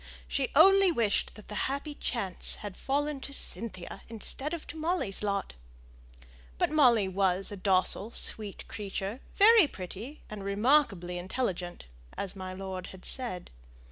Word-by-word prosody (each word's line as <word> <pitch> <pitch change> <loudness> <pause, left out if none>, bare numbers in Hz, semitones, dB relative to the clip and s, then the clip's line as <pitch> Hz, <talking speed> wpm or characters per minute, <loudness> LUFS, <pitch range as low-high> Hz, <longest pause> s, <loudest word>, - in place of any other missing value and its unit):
She 275 -3 -1
only 390 +4 +7
wished 225 -9 0
that 215 - -13
the - - -8 0.2
happy 280 +2 -4
chance 200 -10 -1
had 200 -3 -6
fallen 290 +1 -1
to 280 - -8
Cynthia's 220 -9 -1
instead 235 +6 -4
of 335 -2 -5
to - - -9
Molly's 315 - -1
lot. 200 -2 -2 1.0
But - - +1
Molly 245 -9 +5
was 190 0 0
a - - -4
docile, 190 +2 +3
sweet 215 -3 +1
creature, 200 +2 -5 0.2
very 430 -3 +7
pretty, 210 +8 -8
and 210 -2 -7
remarkably 200 - +2
intelligent, 180 - -3 0.3
as 195 -1 -3
my 185 -1 -6
lord 185 -1 -6
had 190 -1 -12
said. 240 - -2
210 Hz, 140 wpm, -30 LUFS, 190-280 Hz, 1.0 s, only